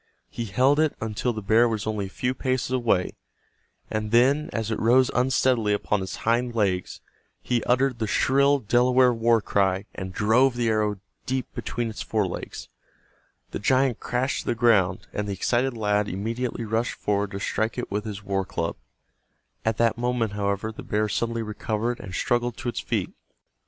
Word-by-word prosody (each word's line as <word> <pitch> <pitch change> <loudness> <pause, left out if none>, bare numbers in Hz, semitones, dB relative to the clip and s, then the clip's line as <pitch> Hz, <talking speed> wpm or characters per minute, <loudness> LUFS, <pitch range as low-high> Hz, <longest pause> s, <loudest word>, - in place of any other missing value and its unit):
He 115 - -4
held 130 +8 +3
it 155 -2 +2
until 110 +3 -2
the 110 -2 -6
bear 115 +4 +4
was 110 -2 -2
only 105 -2 -2
a - - -11
few 125 +6 -2
paces 130 -1 -1
away, 115 -8 +1 0.8
and 110 0 -3
then, 130 +6 +3
as 115 0 -2
it 110 - -1
rose 125 +3 +4
unsteadily 125 -4 +2
upon 105 0 0
its 95 - -5
hind 120 +1 +1
legs, 95 -5 -1 0.4
he 120 -2 -1
uttered 125 0 +2
the 110 - -1
shrill 140 +5 +3
Delaware 125 +1 +3
war 115 0 +3
cry 95 -1 +1
and 95 0 -6
drove 120 +6 +3
the 120 -1 +1
arrow 105 -2 0 0.3
deep 130 0 -2
between 120 -1 -3
its 110 - -6
fore 110 -2 0
legs. 90 - -6 0.8
The - - -4
giant 130 +2 +2
crashed 125 +2 -1
to - - -14
the - - +1
ground, 105 -6 +3
and 105 0 -2
the 100 - -2
excited 120 +5 0
lad 105 -1 +1
immediately 115 +5 -3
rushed 110 +2 -1
forward 100 -1 -1
to 100 -1 -6
strike 110 +4 -1
it 125 - -4
with 105 +1 -1
his 100 -2 -6
war 95 -1 -1
club. 85 -3 -3 0.9
At 110 -1 0
that 115 0 +2
moment, 120 -3 0
however, 100 +1 -2
the 110 - -9
bear 105 +1 -1
suddenly 115 +2 -1
recovered 110 +2 -2
and 95 -3 -7
struggled 120 -1 0
to 120 - -3
its - - -3
feet. - - -2
115 Hz, 180 wpm, -25 LUFS, 105-125 Hz, 0.9 s, bear